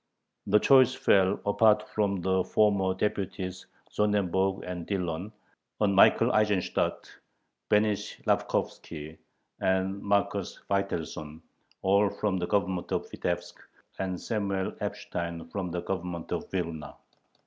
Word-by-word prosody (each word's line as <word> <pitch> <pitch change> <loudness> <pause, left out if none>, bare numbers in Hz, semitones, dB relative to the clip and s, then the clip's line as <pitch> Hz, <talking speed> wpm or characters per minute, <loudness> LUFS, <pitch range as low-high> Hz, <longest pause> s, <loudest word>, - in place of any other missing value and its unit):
The - - +5
choice 130 +3 +5
fell, 100 -7 +3
apart 105 +1 +4
from 100 -3 0
the 95 +1 +2
former 100 -3 +2
deputies 95 -2 -3 0.2
Sonnenberg 95 -2 +1
and 90 -2 -6
Dillon, 90 0 -2 0.5
on 105 -2 +3
Michael 115 +5 +6
Eisenstadt, 105 -4 +1 0.6
Benish 105 0 +1
Lapkovski, 80 0 -2 0.4
and 95 +1 0
Marcus 100 0 0
Veitelson, 80 -6 -2 0.4
all 100 +2 +4
from 100 -2 -1
the 90 -1 -2
Government 95 -3 -1
of - - -2
Vitebsk, - - -3 0.4
and 95 -2 -2
Samuel 100 -4 -2
Epstein 85 -1 -4
from 95 -1 -3
the 85 0 -3
Government 90 -3 -4
of - - -3
Vilna. 85 -5 -4
95 Hz, 115 wpm, -28 LUFS, 90-105 Hz, 0.6 s, Michael